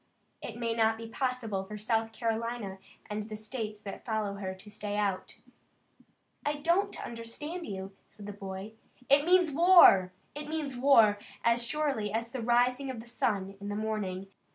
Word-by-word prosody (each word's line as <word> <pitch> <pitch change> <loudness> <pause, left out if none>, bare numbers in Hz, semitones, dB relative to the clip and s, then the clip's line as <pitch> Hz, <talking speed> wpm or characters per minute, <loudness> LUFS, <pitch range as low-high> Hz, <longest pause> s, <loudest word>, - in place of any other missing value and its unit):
It 230 - -7
may 230 -1 -1
not 225 -1 +2
be 225 0 -7
possible 230 -5 -2
for 210 +2 -8
South 225 +1 0
Carolina 225 -3 -3 0.3
and 210 +1 -4
the 215 - -5
states 215 -1 -5
that 200 - -7
follow 215 -3 -1
her 190 -1 -5
to 210 +3 -14
stay 205 -1 -4
out." 200 -3 -1 1.1
"I 295 0 0
don't 345 +7 +1
understand 295 +10 -6
you," 195 0 -6
said 205 -1 -12
the 205 - -6
boy. 195 +1 -7 0.4
"It 285 +1 +6
means 360 -2 +5
war! 315 - +7 0.2
It 295 +1 -7
means 305 -4 -3
war, 230 -6 +5 0.2
as 235 +1 +3
surely 270 -5 -1
as 230 +1 -2
the 260 - -4
rising 245 +3 +2
of 255 -3 -5
the 225 - -9
sun 200 -5 -1
in 200 0 -6
the 205 - -3
morning. 205 -3 -3
225 Hz, 170 wpm, -30 LUFS, 205-255 Hz, 1.1 s, war